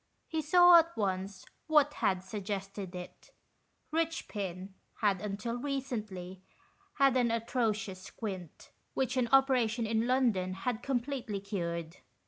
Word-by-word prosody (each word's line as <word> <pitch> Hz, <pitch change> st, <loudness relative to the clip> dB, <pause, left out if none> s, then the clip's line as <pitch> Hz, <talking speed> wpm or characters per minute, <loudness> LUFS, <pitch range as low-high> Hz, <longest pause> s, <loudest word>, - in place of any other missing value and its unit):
He 320 Hz, -1 st, -1 dB
saw 350 Hz, +3 st, +8 dB
at 335 Hz, +1 st, -1 dB
once 190 Hz, -1 st, -2 dB, 0.2 s
what 300 Hz, -2 st, +4 dB
had 185 Hz, -1 st, 0 dB
suggested 195 Hz, -1 st, -5 dB
it. 180 Hz, 0 st, -9 dB, 0.6 s
Richpin 205 Hz, -, -2 dB, 0.3 s
had 200 Hz, -4 st, +2 dB
until 210 Hz, +3 st, -3 dB
recently 215 Hz, -10 st, -4 dB, 0.5 s
had 275 Hz, -2 st, +4 dB
an 245 Hz, -2 st, +3 dB
atrocious 225 Hz, -4 st, -1 dB
squint, 190 Hz, -4 st, -7 dB, 0.2 s
which 265 Hz, -1 st, 0 dB
an 250 Hz, -2 st, +1 dB
operation 250 Hz, -4 st, +3 dB
in 225 Hz, +1 st, 0 dB
London 230 Hz, -8 st, +2 dB
had 220 Hz, +4 st, -2 dB
completely 250 Hz, -5 st, -2 dB
cured. 170 Hz, -4 st, -4 dB
220 Hz, 115 wpm, -32 LUFS, 190-265 Hz, 0.6 s, saw